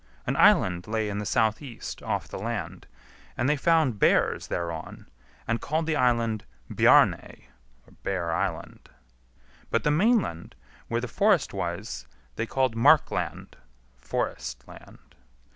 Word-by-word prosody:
An - - -1
island 90 -1 +4
lay 110 -1 -1
in 100 0 -3
the 105 - -4
south 110 +1 +1
east 130 -6 -8
off - - -3
the - - -7
land, 110 -4 -5 0.5
and 120 - 0
they 150 - +3
found 150 -7 +2
bears - - +2
thereon, 85 -2 -5 0.4
and 115 +1 -1
called 160 +2 -1
the 160 -1 0
island 115 -5 +1 0.3
Bjarney - - +3 0.5
(Bear 90 -4 -2
Island); - - -4 0.8
but 115 - 0
the 150 - +2
mainland, 180 - +1 0.3
where 115 0 -1
the 125 - -4
forest 195 - +2
was, 90 - -5 0.3
they 115 - -3
called 130 -2 0
Markland 145 +6 +2 0.4
(forest 60 0 -4
land). - - -16
115 Hz, 130 wpm, -26 LUFS, 95-140 Hz, 0.8 s, island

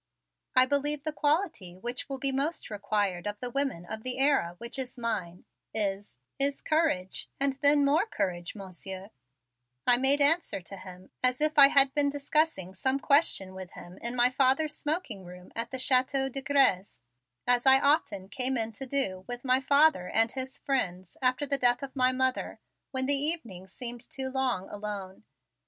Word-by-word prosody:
"I 255 0 +6
believe 285 +1 -1
the 310 0 -3
quality 295 - -1
which 240 +8 -5
will 270 - -3
be 270 +1 -1
most 275 -1 -2
required 205 -3 -2
of 205 0 -5
the 250 -1 -5
women 270 -10 -2
of 220 +4 -7
the 255 +2 -3
era 270 -11 +1
which 235 +5 -7
is 255 -1 -6
mine, 200 -7 -4 0.3
is 200 - -3 0.2
is 275 0 0
courage 305 - -1
and 275 0 +1
then 285 0 +5
more 310 +9 +2
courage, 180 - -3
Monsieur," 190 0 -9 0.7
I 245 -1 +6
made 270 +3 +4
answer 290 - +3
to 185 +2 -11
him 185 -1 -12
as 255 0 +1
if 305 +1 +1
I 280 -1 +9
had 275 -1 +5
been 290 -1 +2
discussing 285 - -1
some 260 +7 0
question 280 - +3
with 190 -1 -10
him 175 +1 -12
in 235 +1 -1
my 245 +1 +4
father's 270 +4 +1
smoking 300 - -3
room 180 0 -13
at 230 +1 -3
the 260 - -5
Chateau 265 +1 +2
de 275 +1 -5
Grez, 235 - +1 0.4
as 245 +1 +2
I 265 0 +9
often 280 - +1
came 255 +5 -1
in 225 -1 -1
to 265 +5 -7
do 195 -9 0
with 245 +1 -6
my 255 0 +4
father 280 - +3
and 225 +1 +2
his 260 0 -5
friends 185 -10 -2
after 255 +3 +1
the 280 0 -1
death 245 +1 +2
of 275 0 -8
my 255 -1 +3
mother 260 0 -1 0.3
when 260 -1 -1
the 285 - +2
evenings 275 - -1
seemed 240 +2 -7
too 265 -1 -4
long 260 -8 -1
alone. 205 -1 -6
255 Hz, 180 wpm, -28 LUFS, 195-280 Hz, 0.7 s, I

